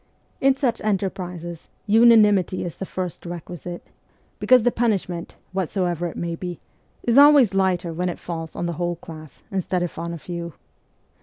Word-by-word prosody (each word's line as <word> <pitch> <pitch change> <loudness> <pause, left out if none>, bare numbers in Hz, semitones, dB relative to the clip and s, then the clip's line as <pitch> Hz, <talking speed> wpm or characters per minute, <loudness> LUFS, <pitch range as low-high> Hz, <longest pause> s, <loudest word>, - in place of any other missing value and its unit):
In 270 0 +4
such 265 -3 -1
enterprises 180 -4 -3 0.2
unanimity 210 -5 +5
is 170 - -6
the 195 - -5
first 180 -2 -5
requisite, 175 0 -7 0.5
because 255 -3 +5
the 245 - +3
punishment, 195 -8 -1 0.2
whatsoever 175 -2 -1
it 165 - -8
may 170 -1 -3
be, 175 0 -6 0.4
is 240 +3 +4
always 285 -8 +7
lighter 185 -3 +1
when 180 +2 -1
it 175 - -5
falls 165 -2 -6
on - - -3
the 170 - -2
whole 175 0 0
class 155 -2 -12
instead 185 -2 -1
of 175 - -5
on 170 0 -4
a 170 - -5
few. 170 0 -6
180 Hz, 160 wpm, -23 LUFS, 170-205 Hz, 0.5 s, always